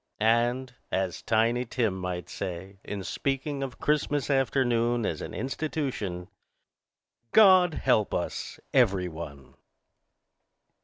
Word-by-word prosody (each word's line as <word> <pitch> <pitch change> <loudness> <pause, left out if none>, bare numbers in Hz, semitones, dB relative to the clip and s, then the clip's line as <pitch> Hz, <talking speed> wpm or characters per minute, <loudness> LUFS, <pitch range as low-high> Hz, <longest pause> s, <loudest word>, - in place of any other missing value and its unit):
And, 120 +3 +2 0.2
as 95 -2 -1
Tiny 115 +2 +2
Tim 115 -4 0
might 90 -2 -4
say 95 +2 -6
in 100 -2 -5
speaking 135 +5 -2
of 135 -2 -4
Christmas 145 -2 0
afternoon 120 -3 +2
as 80 - -2
an - - -6
institution, 130 - -3 1.1
"God 185 -6 +7
help 110 -6 +2
us, 85 - -3
every 100 -8 +3
one." 80 -5 -9
120 Hz, 105 wpm, -28 LUFS, 95-135 Hz, 1.1 s, God